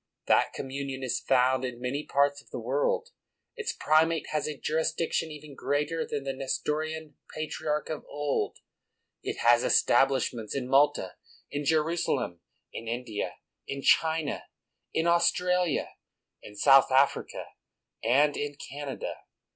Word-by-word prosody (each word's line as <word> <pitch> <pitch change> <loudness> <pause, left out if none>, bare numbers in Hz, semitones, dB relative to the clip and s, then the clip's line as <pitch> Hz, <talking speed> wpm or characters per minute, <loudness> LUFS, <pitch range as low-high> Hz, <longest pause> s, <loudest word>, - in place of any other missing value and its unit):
That - - +3
com 135 - -5
munion 135 -1 -4
is 130 - -1
found 130 0 +3
in 125 -2 -4
many 130 +4 -2
parts 140 0 +1
of - - -24
the - - -6
world; 140 - 0 0.5
its 450 -2 -2
primate 160 +1 +2
has 150 -1 0
a 150 -2 -4
jurisdiction 160 +1 -1
even 150 -1 -10
greater 150 +4 -1
than 145 - -3
the 135 0 -2
Nestorian 150 +3 -3 0.2
Patriarch 155 0 -2
of 155 - -4
old; 145 -1 -1 0.6
it - - -4
has 120 +1 +5
establishments 120 -3 +2
in 130 -2 -2
Malta, 135 -8 +3 0.3
in 145 0 -3
Jerusalem, 155 - 0 0.3
in 115 - -7
India, 115 -2 -3 0.3
in 140 0 -5
China, 160 -2 +2 0.5
in 160 - 0
Australia, 180 -1 +2 0.5
in 105 - -12
South 135 +4 +6
Africa, 135 +2 +2 0.6
and 140 +6 +4
in 145 0 -3
Canada. 140 -1 -6
145 Hz, 130 wpm, -28 LUFS, 130-155 Hz, 0.6 s, South